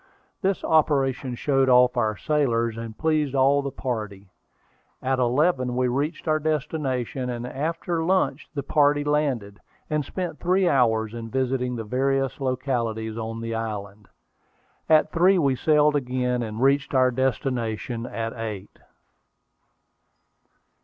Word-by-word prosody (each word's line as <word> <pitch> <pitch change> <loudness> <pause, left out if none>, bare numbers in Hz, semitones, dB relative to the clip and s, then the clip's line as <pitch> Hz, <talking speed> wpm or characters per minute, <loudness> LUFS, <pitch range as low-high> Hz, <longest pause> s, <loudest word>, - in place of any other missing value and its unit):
This 195 -1 0
operation 135 -5 +1
showed 135 +1 +1
off 125 0 +5
our 110 -4 0
sailors, 120 - 0
and 115 -1 -7
pleased 155 -3 0
all 135 +2 +4
the 140 - -3
party. 105 -8 -5 0.7
At 130 0 -1
eleven 130 0 +1
we 125 0 +1
reached 145 +7 -2
our 155 0 +2
destination; 135 -5 -2
and 120 -1 -4
after 160 +5 -2
lunch 180 -5 0
the 140 - -2
party 145 0 +3
landed, 135 -9 -1 0.3
and 150 -1 +1
spent 180 +5 -5
three 185 +1 +2
hours 110 -7 +2
in 115 -1 -6
visiting 125 0 -1
the 115 - -4
various 135 +4 0
localities 120 -4 -2
on 115 0 -5
the 115 0 -4
island. 105 -2 -5 0.8
At 155 -1 +4
three 185 +3 +4
we 140 -6 +2
sailed 150 +2 +3
again, 125 -2 -1
and 110 +1 -3
reached 140 +1 +2
our 130 -1 +4
destination 120 -2 -2
at 115 -1 -4
eight. 105 -4 -7
130 Hz, 130 wpm, -24 LUFS, 115-145 Hz, 0.8 s, off